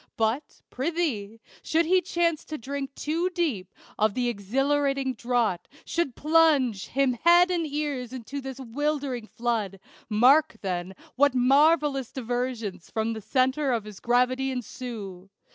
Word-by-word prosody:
But, 225 +6 -1
prithee, 260 -8 -2 0.2
should 330 +1 +1
he 365 +3 +4
chance 340 -2 0
to 310 - -5
drink 275 +2 -5
too 330 +4 -1
deep 295 - -2 0.3
Of 215 -1 +2
the 245 -1 +1
exhilarating 270 +5 0
draught, 235 -6 -1 0.2
should 330 -8 -1
plunge 295 -9 +3
Him 270 -1 +1
head 345 +8 +5
and 335 -3 0
ears 285 -4 -3
into 260 +2 -6
this 265 0 -7
'wildering 270 -1 -2
flood, 220 -6 -2 0.3
Mark, 275 +9 +5
then, 185 -1 -3 0.2
what 285 -1 +4
marvellous 275 +1 +3
diversions 240 -6 -4
From 225 0 -1
the 220 - -6
centre 265 +5 +1
of 230 -3 0
his 210 -2 -10
gravity 250 +2 +1
ensue. 225 -7 -6
260 Hz, 135 wpm, -26 LUFS, 225-295 Hz, 0.3 s, head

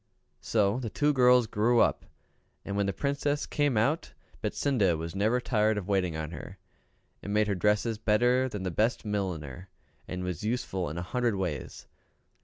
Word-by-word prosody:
So 105 +1 +1
the 120 -4 -4
two 150 +6 +1
girls 125 -2 +5
grew 115 +3 +2
up, - - +2 0.6
and 100 - -4
when 100 -1 +1
the - - +1
Princess 140 +5 -1
came 145 -5 0
out, 140 +10 0 0.3
Betsinda 105 - +1
was 80 +1 -5
never 110 +5 +1
tired 110 -3 +1
of 100 - -4
waiting 95 -5 0
on 80 0 -4
her, - - -9 0.6
and 100 - -6
made 105 +1 +3
her 100 - +1
dresses 105 +3 +1
better 120 +4 +2
than 105 -5 -5
the 95 - -2
best 110 +6 0
milliner, 90 -5 -4 0.4
and 90 0 -4
was 90 -1 -4
useful 105 -7 -2
in 80 - -6
a 85 - -3
hundred 120 +3 0
ways. 85 -9 -4
105 Hz, 175 wpm, -29 LUFS, 95-125 Hz, 0.6 s, girls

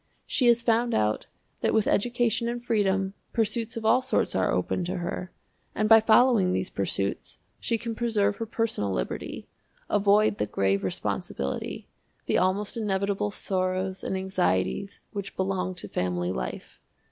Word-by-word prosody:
She 255 - +1
has 235 0 +5
found 235 +1 +2
out 105 0 0 0.3
that - - +1
with 220 - +3
education 240 +1 +1
and 240 0 -5
freedom, 195 -4 +1 0.2
pursuits 225 0 -1
of 225 - -5
all 250 +4 +5
sorts 255 - 0
are - - +1
open 180 - 0
to 175 - -3
her, 180 +1 -4 0.4
and 215 - +1
by 225 0 +8
following 220 -3 +5
these 185 - -2
pursuits 100 0 -2 0.2
she 230 - 0
can 230 0 -4
preserve 210 -3 +1
her 225 - -4
personal 225 - -1
liberty, - - -4 0.4
avoid 210 +1 +3
the - - 0
grave 100 0 +1
responsibility, 70 -6 -3 0.4
the - - +2
almost 195 +4 0
inevitable 200 -1 0
sorrows 185 -1 -2
and 190 - -2
anxieties, 190 - -1
which 200 -2 -5
belong 185 -1 -1
to 175 - -7
family 90 0 -1
life. 65 -7 -5
200 Hz, 150 wpm, -27 LUFS, 180-225 Hz, 0.4 s, by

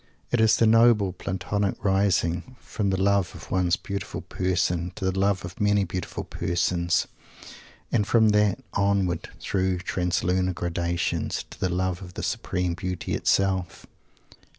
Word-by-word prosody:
It 120 - +2
is 110 -1 +5
the 115 - +4
noble 110 -4 +5
Platonic 100 +2 -2
rising 95 +2 +1
from 100 -2 -2
the 95 -1 0
love 100 -2 +2
of 80 - -11
one 90 -1 +1
beautiful 100 0 -4
person 90 -1 -1
to 100 - -4
the 95 - +2
love 100 -1 +1
of 90 +2 -9
many 105 -1 +3
beautiful 90 0 -4
persons; 85 0 0 0.9
and 105 -3 +1
from 110 -1 +4
that 105 -2 +2
onward, 100 -4 +1
through 95 -1 0
translunar 90 0 0
gradations, 85 -1 -2
to - - -12
the 95 - 0
love 90 +1 -1
of 90 -2 -10
the - - -5
supreme 90 -1 -1
Beauty 90 0 -4
itself. 95 -2 0
95 Hz, 145 wpm, -25 LUFS, 90-100 Hz, 0.9 s, is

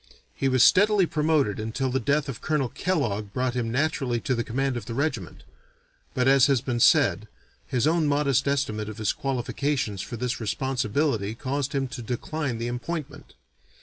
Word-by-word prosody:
He 135 - 0
was 130 -2 +4
steadily 205 +4 +5
promoted 150 - +1
until 115 +5 -2
the 130 - +1
death 140 +4 +1
of 135 -5 -6
Colonel 150 -5 0
Kellogg 110 - -1
brought 125 -1 0
him 120 -2 -2
naturally 130 -3 0
to 130 - -1
the 120 -1 -1
command 135 +3 -1
of 120 - -6
the 115 - -4
regiment; 145 +2 -3 0.7
but, 125 0 +2
as 135 -1 +6
has 135 -3 +3
been 120 -1 -3
said, 110 - +4 0.4
his 125 0 0
own 160 0 +2
modest 145 -2 +1
estimate 110 -7 -1
of 110 - -8
his 110 -2 0
qualifications 135 -4 -2
for 120 - -6
this 125 +1 -2
responsibility 125 -1 -1
caused 140 +3 -3
him 135 -1 0
to 125 - -6
decline 125 +3 -3
the 115 +1 -3
appointment. 140 +5 -6
130 Hz, 175 wpm, -26 LUFS, 115-145 Hz, 0.7 s, as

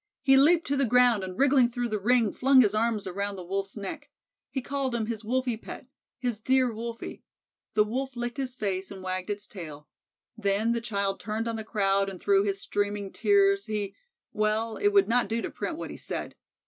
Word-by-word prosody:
He 270 -1 +6
leaped 325 +5 +5
to 280 - 0
the 275 -2 +2
ground 245 -3 +4
and 185 0 -6
wriggling 265 -3 +4
through 245 0 -2
the 215 -1 -1
ring 230 0 +3
flung 265 0 +5
his 210 -4 +3
arms 220 -1 0
around 200 +2 -3
the 185 - -7
Wolf's 195 +3 -3
neck. 290 +9 -6 0.4
He 270 - -2
called 270 -1 -2
him 225 -2 -1
his 225 -1 -4
"Wolfie 250 +1 0
pet," 230 - -9 0.3
his 245 -4 -2
"dear 255 +1 +2
Wolfie" 230 +1 -6 0.5
the 210 - +6
Wolf 260 +5 -3
licked 240 +2 -4
his 260 -2 -3
face 195 -5 -2
and 190 -2 -9
wagged 185 0 -3
its 205 0 -3
tail 155 -6 -9 0.5
then 210 +1 +1
the 235 0 0
child 200 -4 -1
turned 220 +2 -3
on 230 - -2
the 220 - -4
crowd 195 -2 +1
and 190 -2 -8
through 200 0 +3
his 195 -1 -1
streaming 205 -1 -2
tears, 395 -1 +3
he 210 -2 -3 0.4
Well 215 +1 0
it 410 - +2
would 405 -1 +4
not 245 +1 +2
do 225 +1 -1
to - - -4
print - - -4
what - - -6
he - - -8
said. - - -5
225 Hz, 210 wpm, -28 LUFS, 200-255 Hz, 0.5 s, He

